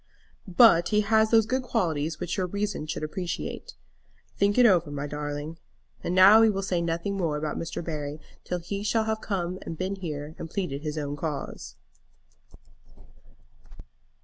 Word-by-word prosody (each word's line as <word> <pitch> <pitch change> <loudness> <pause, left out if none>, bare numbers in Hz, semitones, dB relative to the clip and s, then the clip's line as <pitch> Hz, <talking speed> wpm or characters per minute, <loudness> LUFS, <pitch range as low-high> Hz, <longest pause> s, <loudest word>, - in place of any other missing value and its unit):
"But 175 -3 +6
he 210 -1 +3
has 220 +1 +3
those 225 -1 +5
good 260 +4 0
qualities 160 - -1
which 175 - -3
your 185 -2 -1
reason 200 -4 -3
should 155 0 -4
appreciate. 170 +3 -5 0.6
Think 200 +2 +2
it 250 - +7
over, 175 -8 +4
my 145 0 -4
darling. 150 +2 -5 0.4
And 175 - -1
now 195 +4 +8
we 225 - +6
will 195 -2 -1
say 180 -3 0
nothing 170 +4 -2
more 165 -5 0
about 150 0 -3
Mr. 165 0 -5
Barry 150 -2 -4 0.2
till 180 - -2
he 180 +4 -5
shall 220 +2 +1
have 220 0 -1 0.6
been 190 +3 -3
here 150 -4 -5
and 165 - -6
pleaded 155 -7 -3
his 155 0 -4
own 145 -1 -3
cause." 145 -2 -5
175 Hz, 155 wpm, -27 LUFS, 155-200 Hz, 0.6 s, now